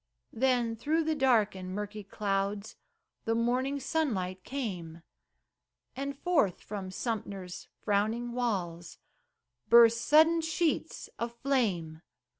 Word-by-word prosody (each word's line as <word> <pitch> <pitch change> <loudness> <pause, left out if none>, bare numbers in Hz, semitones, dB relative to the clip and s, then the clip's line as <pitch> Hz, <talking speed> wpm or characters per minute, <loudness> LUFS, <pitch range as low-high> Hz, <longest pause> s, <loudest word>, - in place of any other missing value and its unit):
Then 240 -1 +1
through 310 +8 0
the 315 0 0
dark 250 -8 +3
and 185 0 -6
murky 210 0 -5
clouds 200 +1 -2 0.5
The 225 - +1
morning 255 +4 0
sunlight 200 - -1
came, 180 -11 -5 0.9
And 275 +1 -4
forth 290 - +1
from 200 -3 -6
Sumter's 195 -3 -5 0.2
frowning 220 +4 0
walls 185 -9 -3 0.7
Burst 230 -1 +7
sudden 320 +4 +5
sheets 325 0 -1
of 235 0 -3
flame. 190 - 0
225 Hz, 105 wpm, -30 LUFS, 195-265 Hz, 0.9 s, Burst